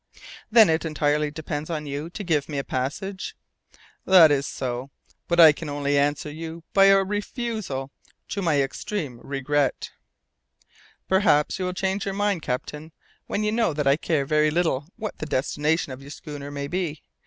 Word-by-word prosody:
"Then 225 Hz, -2 st, +7 dB
it 160 Hz, 0 st, +1 dB
entirely 150 Hz, -1 st, 0 dB
depends 150 Hz, 0 st, -5 dB
on 155 Hz, -3 st, -3 dB
you 145 Hz, +3 st, -4 dB
to 205 Hz, +4 st, -7 dB
give 155 Hz, -6 st, 0 dB
me 145 Hz, -, -3 dB
a 140 Hz, -, -1 dB
passage?" 185 Hz, +11 st, -4 dB, 0.7 s
"That 175 Hz, -5 st, +7 dB
is 140 Hz, -1 st, +1 dB
so, 125 Hz, +1 st, -4 dB, 0.4 s
but 170 Hz, 0 st, +1 dB
I 160 Hz, -2 st, +10 dB
can 150 Hz, +1 st, -7 dB
only 145 Hz, 0 st, -1 dB
answer 145 Hz, +1 st, +1 dB
you 165 Hz, +2 st, -7 dB
by 195 Hz, 0 st, +6 dB
a 195 Hz, 0 st, +6 dB
refusal 205 Hz, -, -4 dB, 0.4 s
to 200 Hz, -, -3 dB
my 150 Hz, -6 st, +2 dB
extreme 135 Hz, -, -4 dB
regret." 140 Hz, +1 st, -1 dB, 1.2 s
"Perhaps 190 Hz, -3 st, +3 dB
you 185 Hz, -, -1 dB
will 180 Hz, -, -2 dB
change 190 Hz, +2 st, -1 dB
your 195 Hz, -1 st, -3 dB
mind, 205 Hz, -4 st, 0 dB
captain, 150 Hz, +5 st, -5 dB, 0.3 s
when 210 Hz, -, -1 dB
you 210 Hz, -, +1 dB
know 225 Hz, -7 st, +1 dB
that 145 Hz, -1 st, -2 dB
I 140 Hz, 0 st, +5 dB
care 155 Hz, -2 st, -1 dB
very 155 Hz, +2 st, +3 dB
little 155 Hz, -4 st, 0 dB
what 215 Hz, -3 st, -6 dB
the 155 Hz, -, -4 dB
destination 150 Hz, +2 st, 0 dB
of 130 Hz, +1 st, -8 dB
your 140 Hz, -, -11 dB
schooner 145 Hz, -1 st, -8 dB
may 140 Hz, 0 st, -4 dB
be. 165 Hz, -2 st, -3 dB
155 Hz, 175 wpm, -24 LUFS, 145-190 Hz, 1.2 s, I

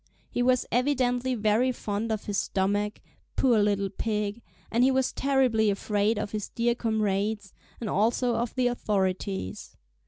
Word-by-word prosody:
He -, -, -1 dB
was 255 Hz, 0 st, +3 dB
evidently 250 Hz, -1 st, +1 dB
very 220 Hz, +3 st, +2 dB
fond 220 Hz, -1 st, -3 dB
of 215 Hz, -1 st, -2 dB
his 205 Hz, -1 st, -1 dB
stomach, 205 Hz, +2 st, -1 dB, 0.3 s
poor 240 Hz, -5 st, +4 dB
little 200 Hz, -2 st, +1 dB
pig, 210 Hz, +1 st, -2 dB, 0.3 s
and 235 Hz, +2 st, +3 dB
he 260 Hz, -, +5 dB
was 265 Hz, -1 st, +1 dB
terribly 255 Hz, -6 st, +2 dB
afraid 205 Hz, +2 st, 0 dB
of 210 Hz, -1 st, -3 dB
his 210 Hz, -2 st, -4 dB
dear 235 Hz, 0 st, +1 dB
comrades, 210 Hz, -3 st, -1 dB, 0.3 s
and 230 Hz, -, -4 dB
also 235 Hz, +5 st, +1 dB
of 235 Hz, 0 st, -2 dB
the 255 Hz, -1 st, +1 dB
authorities. 195 Hz, -, -2 dB
220 Hz, 150 wpm, -27 LUFS, 205-245 Hz, 0.3 s, he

